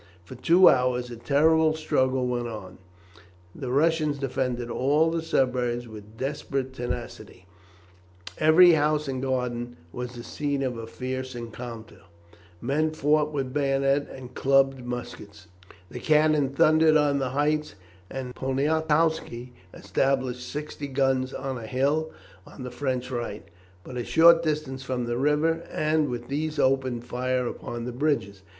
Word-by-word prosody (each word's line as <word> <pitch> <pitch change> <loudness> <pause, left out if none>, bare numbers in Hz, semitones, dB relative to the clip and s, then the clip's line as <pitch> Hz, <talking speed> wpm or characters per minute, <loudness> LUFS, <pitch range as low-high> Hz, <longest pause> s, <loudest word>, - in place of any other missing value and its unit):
For 110 - -11
two 170 +9 +5
hours 125 -1 +2
a - - -6
terrible 155 +5 +3
struggle 130 -4 0
went 120 -1 -2
on. 95 -5 -8 0.7
The 130 -3 -5
Russians 155 +1 +2
defended 125 -3 -2
all 150 +5 +2
the 165 0 -1
suburbs 125 -5 0
with 105 0 -12
desperate 135 0 -3
tenacity, 120 -6 -6 0.9
every 165 +3 +7
house 150 -1 +2
and 130 -1 -3
garden 125 -2 -2 0.2
was 125 +2 -6
the 120 - -8
scene 145 0 -2
of 130 -2 -2
a 115 -1 -7
fierce 130 +2 -5
encounter, 115 -2 -8 0.6
men 150 +5 +1
fought 150 0 +1
with 135 -3 -3
bayonet 140 0 +1
and 130 -1 -10
clubbed 135 -1 +2
muskets, 120 -6 -7 0.5
the 125 - -6
cannon 150 0 +3
thundered 155 +3 +4
on 145 -2 +2
the 130 -1 -1
heights, 145 -2 0 0.3
and 130 -2 -6
Poniatowski 150 -2 0 0.2
established 130 -2 -1
sixty 150 -1 -5
guns 135 -1 +1
on 130 -2 -4
a 110 - -8
hill 145 +6 0 0.4
on 130 - -10
the 125 - -6
French 130 -2 -3
right, 120 -4 -5 0.4
but 125 +3 -8
a 120 - -2
short 165 +3 +6
distance 150 -5 -2
from 130 -2 -3
the 120 +1 -2
river, 150 +4 +2
and 155 -1 +1
with 120 -1 -5
these 150 +3 -3
opened 130 -3 +1
fire 125 +1 -1
upon 120 0 -5
the 125 - -4
bridges. 120 -8 -1
130 Hz, 145 wpm, -26 LUFS, 125-150 Hz, 0.9 s, every